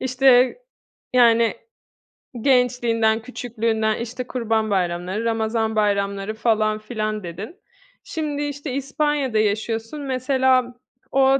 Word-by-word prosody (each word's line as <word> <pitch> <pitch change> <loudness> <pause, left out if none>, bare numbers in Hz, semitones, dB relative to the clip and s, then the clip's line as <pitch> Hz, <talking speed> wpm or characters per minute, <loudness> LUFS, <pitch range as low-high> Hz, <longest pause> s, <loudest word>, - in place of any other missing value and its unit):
işte, 255 - +4 0.6
yani, 235 -2 +5 0.9
gençliğinden, 240 -3 +2
küçüklüğünden, 225 -2 -1
işte, 245 +2 -5
kurban 225 -3 -1
bayramları, 185 +3 -1
ramazan 220 -1 0
bayramları 200 -1 0
falan 215 -1 +1
filan, 215 -1 -3
dedin. 200 - -8 0.4
Şimdi 300 -3 -3
işte 285 -1 -4
İspanya'da 280 -3 0
yaşıyorsun 225 +6 -1
mesela, 260 -1 +1 0.4
o 270 0 +4
230 Hz, 95 wpm, -22 LUFS, 215-260 Hz, 0.9 s, yani